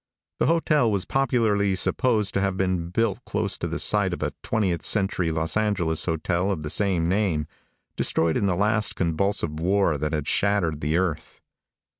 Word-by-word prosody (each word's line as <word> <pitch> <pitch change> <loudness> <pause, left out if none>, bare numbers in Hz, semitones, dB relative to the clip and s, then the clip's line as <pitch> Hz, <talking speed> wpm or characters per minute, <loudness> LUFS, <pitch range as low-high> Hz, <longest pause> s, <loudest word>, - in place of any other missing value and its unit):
The - - +2
hotel 155 -6 +2
was 100 -3 -1
popularly 110 -7 +1
supposed 105 +2 +1
to 100 - 0
have 100 -1 -1
been 90 -3 -1
built 110 +2 -1
close - - -2
to - - -2
the - - -3
site - - +1
of - - -4
a - - -2
twentieth 95 -6 -1
century 95 -4 +1
Los 80 0 -1
Angeles 100 -7 0
hotel 85 +3 -1
of 80 -6 -2
the 75 - -4
same 90 -2 +1
name, 90 -5 0 0.5
destroyed 80 -1 +1
in 100 - +1
the 90 - +1
last 105 +3 0
convulsive 85 -2 -1
war 90 -3 +1
that 75 +1 -2
had 75 -2 -2
shattered 95 -7 +1
the 75 +3 0
earth. 90 -4 -2
95 Hz, 175 wpm, -24 LUFS, 80-105 Hz, 0.5 s, The